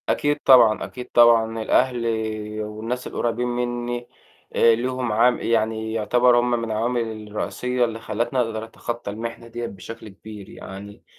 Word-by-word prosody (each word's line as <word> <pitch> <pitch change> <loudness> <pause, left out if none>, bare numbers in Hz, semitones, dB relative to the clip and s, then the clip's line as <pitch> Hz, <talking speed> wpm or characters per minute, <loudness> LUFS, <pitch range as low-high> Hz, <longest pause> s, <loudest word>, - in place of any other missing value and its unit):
أكيد 145 0 +1
طبعًا، 115 -5 +6
أكيد 125 -1 -9
طبعًا 115 -1 +5
الأهل 125 +1 +1 0.6
والناس 110 +4 -4
القريبين 120 +1 -1
مني، 120 0 -3 0.5
آآ 115 -1 +5
ليهم 125 0 -2
عام 120 +3 +3
يعني 110 -1 0
يعتبروا 120 +2 +3
هُم 120 0 0
من 115 -2 -1
العوامل 110 -1 -2
الرئيسية 125 +4 -1
اللي 115 -1 -5
خلّتني 115 +4 -2
أقدر 115 -2 -1
أتخطى 115 -1 -6
المحنة 115 +2 -6
ديّة 120 +1 -5
بشكل 110 +3 -9
كبير، 105 0 -11
يعني 100 +2 -10
115 Hz, 140 wpm, -23 LUFS, 110-120 Hz, 0.6 s, طبعًا